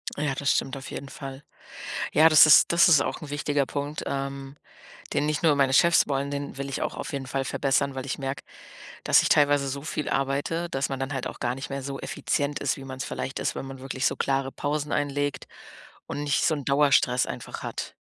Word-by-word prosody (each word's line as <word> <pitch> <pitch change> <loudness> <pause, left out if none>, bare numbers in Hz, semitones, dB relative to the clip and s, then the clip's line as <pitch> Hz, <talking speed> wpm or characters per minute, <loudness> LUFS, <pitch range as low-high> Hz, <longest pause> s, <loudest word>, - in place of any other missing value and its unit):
Ja, 145 -2 -1
das 140 0 +1
stimmt 135 0 -1
auf 135 - -9
jeden 140 - -7
Fall. 135 +1 -8 0.7
Ja, 160 +1 +7
das 155 -2 +8
ist 155 - +7
das 170 +1 +6
ist 155 -5 +6
auch - - -2
'n 150 - -8
wichtiger 145 -1 0
Punkt, 145 +2 -4
ähm, 135 0 -4 0.6
den 150 - +1
nicht 150 -1 -1
nur 160 -3 +5
meine 135 -1 +2
Chefs 170 +4 +5
wollen, 140 0 -1
den 140 -1 -5
will 140 0 -5
ich 135 - -3
auch - - -2
auf 135 - -6
jeden 135 -2 -4
Fall 135 +1 -2
verbessern, 140 +1 0
weil 130 0 -5
ich 140 - -3
merke, 135 0 -4 0.6
dass - - +5
ich - - +1
teilweise 145 -1 +3
so 140 +1 -4
viel 150 -1 -3
arbeite, 140 +5 -1
dass 135 -3 -2
man 135 - -4
dann 135 +2 -3
halt 135 -2 -3
auch - - -9
gar 120 0 -1
nicht 135 +2 -7
mehr 140 0 -4
so 135 0 -5
effizient 145 0 -2
ist, 145 +4 -1
wie 135 - -9
man's 130 -1 -6
vielleicht 135 - -4
ist, - - -1
wenn - - -5
man 135 0 -8
wirklich 130 +1 -3
so - - +1
klare 135 -1 0
Pausen 145 +1 -3
einlegt 145 0 -1 0.6
und 145 - -4
nicht 145 -1 +1
so 160 - +2
'n 145 -3 -6
Dauerstress 140 -3 +3
einfach - - -7
hat. - - -5
140 Hz, 225 wpm, -26 LUFS, 135-145 Hz, 0.7 s, das